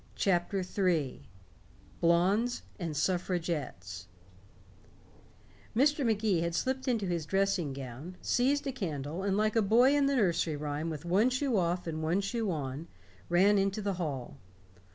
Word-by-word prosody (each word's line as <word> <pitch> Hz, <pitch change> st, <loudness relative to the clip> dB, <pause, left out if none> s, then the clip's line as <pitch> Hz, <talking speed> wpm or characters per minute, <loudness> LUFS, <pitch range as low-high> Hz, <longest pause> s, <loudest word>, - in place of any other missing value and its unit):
CHAPTER 190 Hz, 0 st, +1 dB
III 180 Hz, -7 st, 0 dB, 0.8 s
BLONDES 190 Hz, +8 st, +2 dB, 0.2 s
AND 165 Hz, -5 st, -3 dB
SUFFRAGETTES 150 Hz, -, -2 dB, 1.7 s
Mr. 285 Hz, +4 st, +3 dB
Magee 210 Hz, -7 st, +1 dB
slipped 260 Hz, +9 st, -1 dB
into 230 Hz, -5 st, +1 dB
his 170 Hz, -4 st, -2 dB
dressing 195 Hz, -5 st, +1 dB
gown, 135 Hz, +6 st, -8 dB
seized 280 Hz, +4 st, +1 dB
a 275 Hz, -, -1 dB
candle, 160 Hz, -, -4 dB
and 195 Hz, 0 st, 0 dB
like 215 Hz, 0 st, +2 dB
the 225 Hz, -, +3 dB
boy 240 Hz, +7 st, +5 dB
in 285 Hz, -1 st, +3 dB
the 280 Hz, -, +1 dB
nursery 175 Hz, -, +1 dB
rhyme 150 Hz, +2 st, -3 dB
with 155 Hz, 0 st, -6 dB
one 195 Hz, +8 st, +3 dB
shoe 255 Hz, -1 st, 0 dB
off 175 Hz, -1 st, 0 dB
and 160 Hz, -2 st, -4 dB
one 165 Hz, +4 st, +1 dB
shoe 220 Hz, +1 st, -2 dB
on, 145 Hz, -1 st, -4 dB, 0.4 s
ran 195 Hz, +4 st, +4 dB
into 195 Hz, +1 st, 0 dB
the 200 Hz, -1 st, -1 dB
hall. 135 Hz, -7 st, -4 dB
185 Hz, 140 wpm, -31 LUFS, 160-215 Hz, 1.7 s, boy